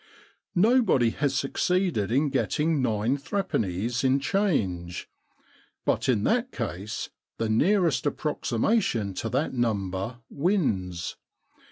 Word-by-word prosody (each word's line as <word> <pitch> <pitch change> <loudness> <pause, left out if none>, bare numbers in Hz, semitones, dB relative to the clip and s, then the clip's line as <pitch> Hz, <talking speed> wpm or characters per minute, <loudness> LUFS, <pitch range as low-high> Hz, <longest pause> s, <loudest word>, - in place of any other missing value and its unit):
Nobody 195 - +4
has 140 +1 -1
succeeded 145 - 0
in 140 +4 +2
getting 150 +2 +1
nine 115 +2 +1
threepennies 120 - -1
in 135 +1 +3
change. 110 - -1 0.8
But - - +1
in 110 -5 +2
that 245 - +1
case 105 -3 -4 0.3
the 115 - -1
nearest 170 - +2
approxi 145 -4 -2
mation 115 - +1
to 115 - -2
that 135 +6 0
number 105 -2 -1
wins. 105 - -1
130 Hz, 110 wpm, -27 LUFS, 105-170 Hz, 0.8 s, Nobody